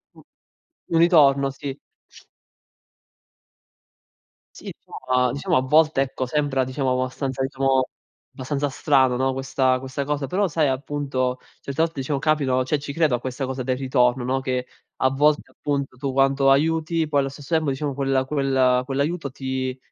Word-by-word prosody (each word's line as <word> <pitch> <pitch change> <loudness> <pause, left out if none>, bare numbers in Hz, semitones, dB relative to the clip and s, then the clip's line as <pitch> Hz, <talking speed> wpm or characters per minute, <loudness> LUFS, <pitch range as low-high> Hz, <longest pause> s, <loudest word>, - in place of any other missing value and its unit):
Mh. - - -16 0.7
Un 165 - +3
ritorno, 140 -5 +5
sì. 135 0 -7 2.8
Sì, - - -8 0.4
no 125 -1 +2
diciamo 140 -1 0
a - - +3
volte 155 +2 +3
ecco 130 -1 -1
sembra 140 0 0
diciamo 130 0 -1
abbastanza 130 +1 -2
diciamo 135 -1 +1 0.4
abbastanza 140 +2 -3
strano, 130 -3 +2
no, 130 0 +1
questa 130 -1 0
questa 135 +1 -4
cosa, 145 -1 -2
però 195 +8 +1
sai 155 -3 +1
appunto 130 -2 -2 0.2
certe 140 +3 -3
volte 165 -3 -3
diciamo 135 +1 -2
capitano, 135 -4 +1
cioè, 145 +3 -1
ci 140 0 -6
credo 155 -6 +2
a - - -4
questa 130 +2 -4
cosa 130 0 -4
del 130 +1 0
ritorno, 125 -1 +1
no, 130 +2 0
che 125 -1 -2 0.3
a 130 - +2
volte 145 +3 +1
appunto 140 -3 -3
tu 135 0 -3
quanto 135 0 +3
aiuti, 160 +3 +1
poi 145 - +2
allo 135 - +1
stesso 140 +3 -8
tempo 160 -2 +2
diciamo 140 +1 -2
quel 135 -1 0
quel 135 -3 +2
quell'aiuto 140 +3 -2
ti 130 -1 -4
135 Hz, 155 wpm, -23 LUFS, 130-145 Hz, 2.8 s, ritorno